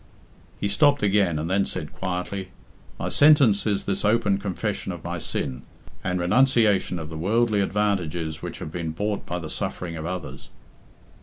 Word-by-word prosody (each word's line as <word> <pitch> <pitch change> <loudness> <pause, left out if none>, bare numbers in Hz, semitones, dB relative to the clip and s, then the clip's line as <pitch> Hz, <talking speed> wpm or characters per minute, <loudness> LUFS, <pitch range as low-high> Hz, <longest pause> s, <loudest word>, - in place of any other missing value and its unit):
He 100 - 0
stopped 140 +7 +3
again, 100 -5 +3
and 75 +2 -2
then 95 +2 +2
said - - -4
quietly, 95 +1 -4 0.5
"My - - -3
sentence 140 -9 +5
is 100 -2 +1
this 100 - -1
open 105 -2 +2
confession 100 -3 -3
of - - -8
my - - -4
sin, 65 -1 -3 0.4
and 90 0 -1
renunciation 105 -1 +3
of 80 -1 -6
the 80 - -6
worldly 110 +3 +2
advantages 90 -6 -1
which - - -6
have 75 - -7
been 80 -2 -4
bought 105 +4 -3
by 90 - -2
the 85 -3 -5
suffering 85 +2 -4
of 80 0 -5
others." 90 -3 -6
95 Hz, 165 wpm, -25 LUFS, 85-105 Hz, 0.5 s, sentence